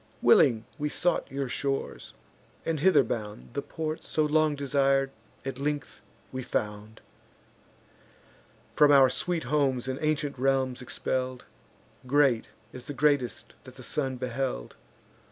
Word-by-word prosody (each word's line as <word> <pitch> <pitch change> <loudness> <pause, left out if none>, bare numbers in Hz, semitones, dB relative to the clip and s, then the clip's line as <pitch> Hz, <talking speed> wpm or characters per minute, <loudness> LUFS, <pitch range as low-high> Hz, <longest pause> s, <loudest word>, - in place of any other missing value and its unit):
Willing 115 -3 +5
we 150 0 -1
sought 175 +4 0
your 135 0 -3
shores; 135 +2 -3 0.5
and, 160 -2 -1
hither 185 -2 +5
bound, 105 - -5
The - - -2
port, 155 0 -4
so 155 - 0
long 155 0 +2
desir'd, 135 -1 +2 0.3
at 135 -1 -4
length 145 +1 -3 0.3
we 130 - -4
found; 105 -2 -4 1.7
From 150 -1 +6
our 135 -2 +7
sweet 175 +4 -1
homes 135 -2 +1
and 130 0 -3
ancient 155 -3 -1
realms 130 -1 +1
expell'd; 130 0 -3 0.6
Great 135 -4 +3 0.2
as 130 - -9
the 145 - -4
greatest 140 -3 +1
that - - -13
the - - -11
sun 135 -3 -1
beheld. 125 - -3
135 Hz, 130 wpm, -28 LUFS, 125-150 Hz, 1.7 s, our